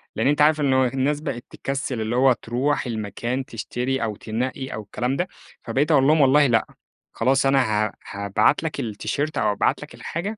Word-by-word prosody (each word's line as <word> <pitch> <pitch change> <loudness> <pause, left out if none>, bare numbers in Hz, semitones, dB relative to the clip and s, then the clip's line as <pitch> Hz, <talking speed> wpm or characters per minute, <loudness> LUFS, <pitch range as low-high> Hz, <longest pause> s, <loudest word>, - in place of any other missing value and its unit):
لأن 110 - +1
أنت 145 +1 +2
عارف 155 0 +4
إنه 130 -2 +3
الناس 135 +4 -1
بقيت 130 -6 -5
تكسِّل 135 -3 -3
اللي 110 +2 -2
هو 130 +1 +5
تروح 130 +6 -1
المكان 120 +3 -3
تشتري 125 +4 -3
أو 110 -2 -2
تنقّي 130 +5 -4
أو 110 - -4
الكلام 125 +5 -2
ده، 180 +5 -1 0.3
فبقيت 135 +7 0
أقول 140 -3 +5
لهم 155 0 +5
والله 140 +2 +5
لأ، 115 -3 +2 0.5
خلاص 130 +3 +2
أنا 135 0 +4 0.2
ها 105 - -5 0.2
هابعت 100 +9 +1
لك 160 - -3
التيشيرت 140 +7 -3
أو - - +2
أبعت 100 - 0
لك - - -10
الحاجة 200 +7 -4
130 Hz, 185 wpm, -23 LUFS, 115-145 Hz, 0.5 s, هو